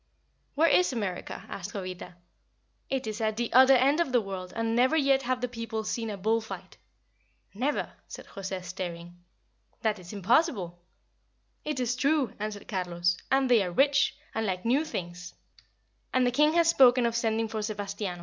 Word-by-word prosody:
"Where 320 +3 +4
is 360 0 +4
America?" 200 -7 -4
asked 200 +1 -7
Jovita. 185 -2 -7 0.7
"It 265 -2 -2
is 215 +1 -4
at 220 -1 0
the 240 -1 -2
other 260 +2 +8
end 275 +5 +3
of 335 -6 +1
the 245 - +4
world, 190 -3 -6
and 230 0 -1
never 255 +6 +3
yet 275 -2 +3
have 255 0 -2
the 250 - 0
people 230 -2 -5
seen 225 +1 -3
a 205 - -5
bull 220 +4 +1
fight." 220 - -9 0.8
"Never?" 260 +9 -2
said - - -10
José, 190 -1 -6
staring. 175 -1 -6 0.7
"That 215 -2 0
is 175 -1 -11
impossible!" 200 - +1 0.8
"It 300 -3 -3
is 245 -1 0
true," 280 0 +1
answered 210 -1 -5
Carlos. 175 -2 -1
"And 270 0 +3
they 240 -4 +5
are 185 - -1
rich, 275 +10 +2 0.2
and 220 -1 -1
like 185 0 -3
new 270 +7 +2
things; 180 - -6 0.8
and 255 -1 +2
the 245 - +2
king 300 +4 +3
has 340 -1 +4
spoken 255 -6 +5
of 235 0 0
sending 225 -1 0
for 220 0 -4
Sebastiano. 205 -3 -4
225 Hz, 175 wpm, -28 LUFS, 195-260 Hz, 0.8 s, other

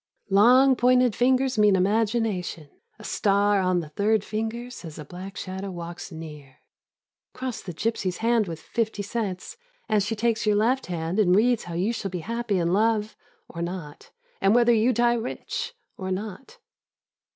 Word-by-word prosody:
" - - -44
Long 250 +7 +6
pointed 250 -2 +3
fingers 255 -1 +2
mean 210 -2 +5
imagination; 200 -5 0 0.3
a 220 - -13
star 205 -1 +2
on 185 -1 +1
the 155 - -9
third 205 +6 +1
finger 225 +3 -4
says 165 -10 -9
a 150 - -8
black 185 +5 -9
shadow 190 +1 -5
walks 175 0 -7
near." 150 -5 -10 0.8
Cross 255 -2 -4
the 180 - -7
g3^sy's 185 0 -2
hand 230 -2 +2
with 165 -2 -6
fifty 220 +2 -2
cents 200 - -4 0.3
and 215 -2 +2
she 210 +3 -2
takes 225 0 0
your 210 - +4
left 245 +6 +1
hand 170 +2 -2
and 185 -4 +4
reads 235 +3 +2
how 170 -1 -6
you 195 +7 0
shall 200 -4 -4
be 180 -2 -4
happy 230 -2 -1
in 170 0 +1
love, 215 +1 +1 0.3
or 170 - -7
not, 170 -4 -6 0.3
and 195 +3 +4
whether 240 0 +5
you 230 +3 +3
die 240 -1 +3
rich, 235 0 -4 0.2
or 185 -1 -4
not. 200 +5 -6
210 Hz, 170 wpm, -25 LUFS, 180-230 Hz, 0.8 s, Long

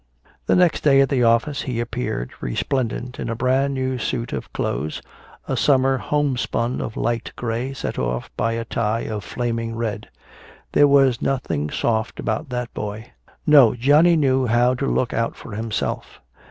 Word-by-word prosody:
The - - +4
next 180 -3 +3
day 135 -2 +5
at 135 - +2
the 135 -3 +1
office 115 +5 +2
he 125 -3 -3
appeared 120 - -3
resplendent 125 - -2
in - - -3
a 115 - -2
brand 130 +3 +1
new 130 -1 -2
suit 115 +1 -3
of - - -5
clothes, 75 +5 -2 0.5
a - - -1
summer 135 -2 +3
homespun 130 -4 -1
of 110 - -5
light 115 -1 -1
gray 120 +2 -3
set - - -4
off 60 0 -2
by 115 - 0
a 115 0 -3
tie 115 0 -1
of 105 -2 -4
flaming 115 +2 -3
red. 115 -2 -4 0.6
There 145 - +5
was 135 -3 +4
nothing 125 - -1
soft 110 +4 -1
about 120 +7 -2
that 125 -1 -4
boy. 105 +2 -6 0.3
No, 140 -7 +6
Johnny 150 +8 +5
knew 135 -4 +2
how 120 +2 +3
to 135 +2 -2
look 125 - 0
out 115 0 -1
for - - -11
himself. 110 +1 -3
120 Hz, 165 wpm, -22 LUFS, 115-135 Hz, 0.6 s, No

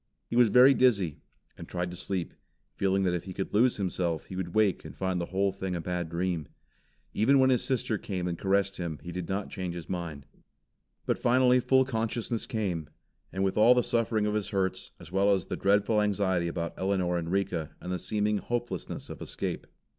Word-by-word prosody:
He - - -5
was 120 -2 +6
very 125 +5 +7
dizzy, 100 - +2 0.4
and - - -8
tried 90 0 -3
to - - -7
sleep, 90 -1 -3 0.4
feeling 95 0 +1
that 90 -2 +1
if 90 - -3
he 95 -2 -7
could 95 - -4
lose 120 +4 +4
himself, 90 -4 -1
he 95 - -8
would 90 -1 -4
wake 105 -4 +2
and - - -10
find 95 -2 -1
the 85 - -3
whole 95 +1 +1
thing 95 -1 -4
a - - -2
bad 90 0 -3
dream. 85 -2 -2 0.7
Even 130 +7 +4
when 130 0 +5
his 125 - +2
sister 120 -5 -1
came 90 -3 -3
and 85 - -2
caressed 100 +2 +1
him, 85 -4 -4
he 85 - -6
did 90 -1 -5
not 95 +1 -2
change 90 -2 -4
his 85 -2 -7
mind. 85 -6 -5 0.8
But - - 0
finally 125 +1 +4
full 130 +1 +3
consciousness 115 -2 -2
came, 95 - -2 0.4
with 95 +2 0
all 120 +3 +7
the 125 - +3
suffering 115 -3 +1
of 105 - 0
his 105 -2 -1
hurts, 95 -2 -1
as 85 - -12
well 100 +2 +3
as 95 -3 +2
the - - -4
dreadful 105 +2 +2
anxiety 95 -4 +1
about 85 0 -3
Elinor 95 -2 0
and 85 -1 -2
Rika 95 -5 -1
and 90 - -6
the 90 - -2
seeming 105 -1 0
hopelessness 120 -7 -4
of - - -9
escape. - - -4
95 Hz, 205 wpm, -29 LUFS, 90-110 Hz, 0.8 s, very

